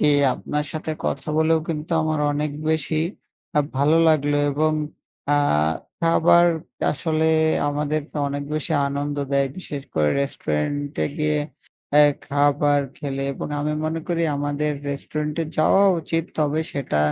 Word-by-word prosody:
জ্বী। -, -, +4 dB, 0.3 s
আপনার 150 Hz, 0 st, -3 dB
সাথে 155 Hz, 0 st, -3 dB
কথা -, -, -2 dB
বলেও 160 Hz, 0 st, +4 dB
কিন্তু 160 Hz, 0 st, -3 dB
আমার 155 Hz, -1 st, 0 dB
অনেক 150 Hz, +1 st, -1 dB, 0.2 s
বেশি 160 Hz, 0 st, 0 dB, 0.6 s
আ 150 Hz, -, +6 dB, 0.2 s
ভালো 145 Hz, +4 st, +4 dB
লাগলো, 145 Hz, -2 st, +2 dB
এবং 155 Hz, +2 st, +1 dB, 0.6 s
আ -, -, +3 dB, 0.6 s
খাবার 170 Hz, +1 st, +5 dB, 0.5 s
আসলে 160 Hz, +1 st, -1 dB, 0.4 s
আমাদেরকে 150 Hz, +1 st, -2 dB
অনেক 145 Hz, 0 st, -3 dB
বেশি 155 Hz, -3 st, -2 dB, 0.2 s
আনন্দ 145 Hz, +1 st, -3 dB, 0.2 s
দেয়। 140 Hz, 0 st, +3 dB
বিশেষ 145 Hz, -6 st, -6 dB
করে 75 Hz, -1 st, +3 dB
রেস্টুরেন্টে-এ 140 Hz, -, -2 dB
গিয়ে 150 Hz, 0 st, +1 dB, 0.9 s
খাবার 145 Hz, 0 st, +2 dB, 0.2 s
খেলে 135 Hz, -1 st, -3 dB
এবং 135 Hz, -, -5 dB
আমি 150 Hz, +1 st, -1 dB
মনে 160 Hz, +1 st, -2 dB
করি, 170 Hz, -1 st, 0 dB
আমাদের 145 Hz, +1 st, -1 dB, 0.2 s
রেস্টুরেন্ট-এ 150 Hz, +3 st, -3 dB
যাওয়া 175 Hz, +5 st, +5 dB, 0.2 s
উচিত, 165 Hz, +1 st, -1 dB
তবে 150 Hz, +1 st, +1 dB
সেটা 135 Hz, -, -1 dB
150 Hz, 130 wpm, -23 LUFS, 145-155 Hz, 0.9 s, আ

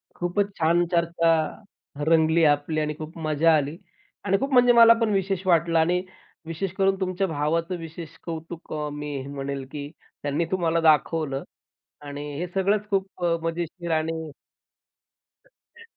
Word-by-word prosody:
खूपच 195 Hz, +3 st, -1 dB
छान 170 Hz, +2 st, +3 dB
चर्चा, 165 Hz, -2 st, +2 dB, 0.6 s
रंगली 160 Hz, 0 st, +4 dB
आपली 145 Hz, +1 st, +2 dB
आणि 150 Hz, 0 st, -1 dB
खूप 155 Hz, +1 st, -8 dB
मजा 155 Hz, +2 st, +4 dB
आली. 145 Hz, +2 st, -3 dB, 0.5 s
आणि 195 Hz, 0 st, +3 dB
खूप 275 Hz, +3 st, -2 dB
म्हणजे 245 Hz, -1 st, +6 dB
मला 230 Hz, -1 st, +8 dB
पण 225 Hz, -, +2 dB
विशेष 195 Hz, -1 st, -1 dB
वाटलं 165 Hz, -1 st, +3 dB
आणि 175 Hz, +3 st, +2 dB, 0.4 s
विशेष 165 Hz, +3 st, -3 dB
करून 195 Hz, 0 st, +2 dB
तुमच्या 185 Hz, +1 st, -1 dB
भावाचं 165 Hz, +3 st, -1 dB
विशेष 165 Hz, -1 st, -9 dB
कौतुक 165 Hz, 0 st, -7 dB
अ, 150 Hz, -1 st, -3 dB
मी 145 Hz, 0 st, -5 dB
हे 135 Hz, -, -8 dB
म्हणेल 140 Hz, -1 st, -5 dB
की, 145 Hz, -1 st, -6 dB, 0.3 s
त्यांनी 145 Hz, +4 st, 0 dB
तुम्हाला 170 Hz, -3 st, +1 dB
दाखवलं 155 Hz, -2 st, +2 dB, 0.6 s
आणि 145 Hz, 0 st, -6 dB, 0.2 s
हे 175 Hz, -, -2 dB
सगळंच 200 Hz, +2 st, +1 dB
खूप 190 Hz, -2 st, -2 dB, 0.2 s
मजेशीर 170 Hz, +1 st, -4 dB
आणि 160 Hz, -1 st, -2 dB, 1.1 s
सत्य, -, -, -21 dB
165 Hz, 145 wpm, -25 LUFS, 155-185 Hz, 1.1 s, मला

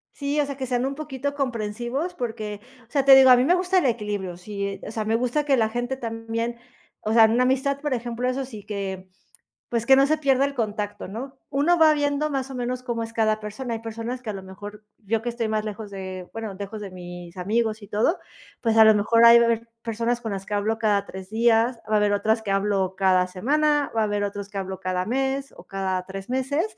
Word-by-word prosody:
Sí, 285 Hz, +1 st, -1 dB
o -, -, 0 dB
sea, 280 Hz, -1 st, -6 dB
que 265 Hz, -, -3 dB
sean 245 Hz, 0 st, 0 dB
un 275 Hz, -, -2 dB
poquito 285 Hz, -2 st, -4 dB
comprensivos 245 Hz, +5 st, -2 dB
porque, 220 Hz, -7 st, -4 dB, 0.3 s
o -, -, -34 dB
sea, 275 Hz, -2 st, +1 dB
te 270 Hz, -1 st, +10 dB
digo, 265 Hz, -1 st, +8 dB
a 250 Hz, -, +10 dB
mí 250 Hz, -, +3 dB
me 345 Hz, -, +4 dB
gusta 365 Hz, +1 st, +1 dB
el 355 Hz, -, +3 dB
equilibrio, 205 Hz, -6 st, -2 dB
sí, 200 Hz, +1 st, -5 dB
o -, -, -6 dB
sea, 220 Hz, -1 st, -3 dB
me 220 Hz, +1 st, +1 dB
gusta 250 Hz, +5 st, 0 dB
que 280 Hz, -2 st, +4 dB
la 220 Hz, -2 st, +2 dB
gente 245 Hz, +3 st, -2 dB
también, 230 Hz, 0 st, -3 dB, 0.4 s
o 215 Hz, -, -1 dB
sea, 225 Hz, -1 st, +8 dB
en 220 Hz, -, +2 dB
una 245 Hz, +2 st, +3 dB
amistad, 270 Hz, +2 st, +1 dB
por 295 Hz, -1 st, -2 dB
ejemplo, 240 Hz, 0 st, -2 dB
eso 255 Hz, +2 st, -1 dB
sí 220 Hz, -6 st, -10 dB
que, 195 Hz, -2 st, -5 dB, 0.6 s
pues 235 Hz, -1 st, -1 dB
que 265 Hz, -, +8 dB
no 270 Hz, +1 st, +5 dB
se 310 Hz, +2 st, +1 dB
pierda 275 Hz, -2 st, +3 dB
el 280 Hz, -, -5 dB
contacto, 210 Hz, -4 st, -3 dB
¿no?, 260 Hz, +7 st, -7 dB
uno 310 Hz, +6 st, +3 dB
va 315 Hz, -1 st, +7 dB
viendo 290 Hz, +1 st, 0 dB
más 270 Hz, -1 st, -2 dB
o -, -, -6 dB
menos 250 Hz, 0 st, -3 dB
cómo 235 Hz, -2 st, -2 dB
es 225 Hz, -, -9 dB
cada 220 Hz, -1 st, +1 dB
persona. 230 Hz, +3 st, -5 dB
Hay 225 Hz, -, -5 dB
personas 230 Hz, +2 st, -5 dB
que 220 Hz, -, -4 dB
a -, -, -2 dB
lo 195 Hz, -1 st, -7 dB
mejor, 205 Hz, +3 st, -10 dB
yo 220 Hz, +1 st, -1 dB
que 240 Hz, -, -3 dB
estoy 235 Hz, -1 st, -2 dB
más 215 Hz, 0 st, -1 dB
lejos 215 Hz, 0 st, -6 dB
de, 185 Hz, -2 st, -6 dB
bueno, 220 Hz, -3 st, -5 dB
lejos 200 Hz, +2 st, -7 dB
de 200 Hz, -2 st, -6 dB
mis 175 Hz, -1 st, -9 dB
amigos 215 Hz, +3 st, -1 dB
y 205 Hz, -, -11 dB
todo, 220 Hz, -, +1 dB, 0.4 s
pues 225 Hz, -2 st, +1 dB
a 220 Hz, -, +9 dB
lo 220 Hz, 0 st, +7 dB
mejor 230 Hz, +3 st, +4 dB
ahí 235 Hz, 0 st, +10 dB
va -, -, +5 dB
a -, -, +3 dB
haber 230 Hz, 0 st, 0 dB
personas 230 Hz, +1 st, -1 dB
con 225 Hz, -2 st, -4 dB
las 195 Hz, -1 st, -4 dB
que 210 Hz, -, -3 dB
hablo 215 Hz, +2 st, 0 dB
cada 205 Hz, -3 st, +2 dB
3 190 Hz, 0 st, -9 dB
días, 230 Hz, +2 st, +3 dB
va -, -, +2 dB
a -, -, +6 dB
haber 210 Hz, -1 st, +3 dB
otras 220 Hz, +2 st, +1 dB
que 205 Hz, -, -4 dB
hablo 195 Hz, -1 st, 0 dB
cada 185 Hz, -1 st, +3 dB
semana, 290 Hz, +9 st, +1 dB
va -, -, +3 dB
a -, -, +3 dB
haber 205 Hz, -1 st, -1 dB
otros 200 Hz, 0 st, -5 dB
que 205 Hz, -, -6 dB
hablo 190 Hz, -1 st, -4 dB
cada 185 Hz, 0 st, -2 dB
mes 270 Hz, +3 st, -1 dB
o -, -, -13 dB
cada 190 Hz, -1 st, -2 dB
3 195 Hz, +2 st, -8 dB
meses, 265 Hz, +5 st, 0 dB
225 Hz, 250 wpm, -24 LUFS, 205-260 Hz, 0.6 s, te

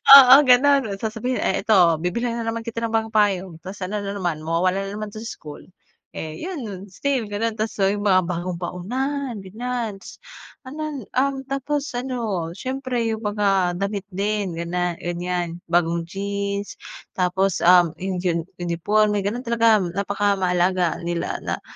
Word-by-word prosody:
Oo, 265 Hz, -2 st, +11 dB
gano'n, 255 Hz, -4 st, +4 dB
sasabihin, 225 Hz, +4 st, -2 dB
"Eh, 190 Hz, -, 0 dB
ito, 180 Hz, -7 st, +5 dB
bibilhan 235 Hz, +7 st, -1 dB
na 230 Hz, -, -3 dB
naman 225 Hz, 0 st, -2 dB
kita 230 Hz, 0 st, -4 dB
ng 230 Hz, -, -1 dB
bagong 225 Hz, 0 st, 0 dB
payong, 195 Hz, -4 st, +2 dB
tapos 190 Hz, +1 st, -8 dB
ano 205 Hz, +2 st, -3 dB
na 200 Hz, -, -3 dB
naman, 175 Hz, -6 st, -2 dB
mawawala 180 Hz, +4 st, 0 dB
na 195 Hz, -, -5 dB
naman 215 Hz, 0 st, -5 dB
sa 215 Hz, -, -7 dB
school. 155 Hz, -10 st, -8 dB, 0.5 s
Eh, 155 Hz, -1 st, -6 dB
yun 340 Hz, -7 st, -5 dB
nun, 195 Hz, -4 st, -7 dB
still 250 Hz, +2 st, -1 dB
ganun 220 Hz, +2 st, -1 dB
tapos 215 Hz, 0 st, -3 dB
yung 205 Hz, +1 st, 0 dB
mga 185 Hz, -3 st, +4 dB
bagong 175 Hz, +1 st, -3 dB
baonan, 245 Hz, +9 st, -3 dB
ganiyan, 225 Hz, 0 st, -4 dB
tas -, -, -11 dB, 0.5 s
anan, 295 Hz, -2 st, -5 dB
um, 270 Hz, +1 st, 0 dB
tapos 280 Hz, +2 st, -2 dB
ano, 235 Hz, -9 st, -2 dB
siyempre 255 Hz, -2 st, -2 dB
yung 220 Hz, -, -5 dB
mga 195 Hz, -4 st, +1 dB
damit 200 Hz, 0 st, -2 dB
din 200 Hz, -2 st, -2 dB
ganan 175 Hz, 0 st, -2 dB
ganiyan, 175 Hz, 0 st, -3 dB
bagong 170 Hz, -1 st, +2 dB
jeans 200 Hz, +1 st, -3 dB, 0.4 s
tapos, 185 Hz, 0 st, +1 dB
um, 175 Hz, -2 st, +6 dB
yung 190 Hz, -1 st, -2 dB
diyan, 175 Hz, -2 st, +1 dB, 0.2 s
uniporme, 205 Hz, +5 st, +1 dB
ganun 225 Hz, +6 st, -3 dB
talaga 230 Hz, -2 st, +4 dB
napakamahalaga 185 Hz, -2 st, +1 dB
nila 170 Hz, 0 st, -2 dB
na -, -, -2 dB
200 Hz, 155 wpm, -23 LUFS, 180-230 Hz, 0.5 s, Oo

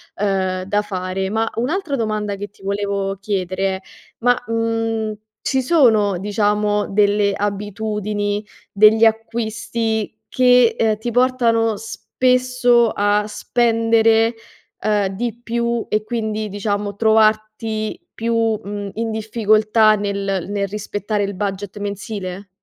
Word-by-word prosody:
ehm, 190 Hz, -2 st, -1 dB
da 205 Hz, +2 st, 0 dB
fare. 190 Hz, -1 st, -3 dB
Ma, 225 Hz, +2 st, 0 dB
un'altra 290 Hz, +4 st, -1 dB
domanda 215 Hz, -3 st, -2 dB
che 205 Hz, +1 st, -5 dB
ti 195 Hz, -, -22 dB
volevo 200 Hz, 0 st, -2 dB
chiedere: 190 Hz, -1 st, -2 dB, 0.4 s
ma, 245 Hz, +1 st, +4 dB
mhmm, 225 Hz, 0 st, 0 dB, 0.6 s
ci 265 Hz, -1 st, 0 dB
sono 225 Hz, -, +3 dB
diciamo 210 Hz, +1 st, 0 dB
delle 205 Hz, 0 st, +2 dB
abitudini 205 Hz, 0 st, -2 dB, 0.3 s
degli 215 Hz, +2 st, +5 dB
acquisti 225 Hz, -1 st, -1 dB
che, 250 Hz, -2 st, +4 dB
ehm, 220 Hz, -1 st, +2 dB
ti 235 Hz, +2 st, -4 dB
portano 230 Hz, -3 st, +2 dB
spesso 250 Hz, +1 st, +2 dB
a 205 Hz, +1 st, +1 dB
spendere, 225 Hz, 0 st, +2 dB, 0.5 s
ehm, 210 Hz, -2 st, +1 dB
di 230 Hz, +3 st, -4 dB
più 235 Hz, 0 st, -1 dB
e 215 Hz, 0 st, 0 dB
quindi 215 Hz, -2 st, -2 dB
diciamo 205 Hz, 0 st, -2 dB
trovarti 215 Hz, 0 st, +1 dB
più, 230 Hz, +1 st, -2 dB, 0.3 s
mhmm, 205 Hz, 0 st, -5 dB
in 225 Hz, 0 st, -2 dB
difficoltà 215 Hz, 0 st, +3 dB
nel 200 Hz, -2 st, -2 dB
nel 200 Hz, -1 st, -1 dB
rispettare 205 Hz, 0 st, -3 dB
il 200 Hz, 0 st, -3 dB
budget 200 Hz, 0 st, -4 dB
mensile? 200 Hz, -1 st, -5 dB
215 Hz, 115 wpm, -20 LUFS, 200-225 Hz, 0.6 s, degli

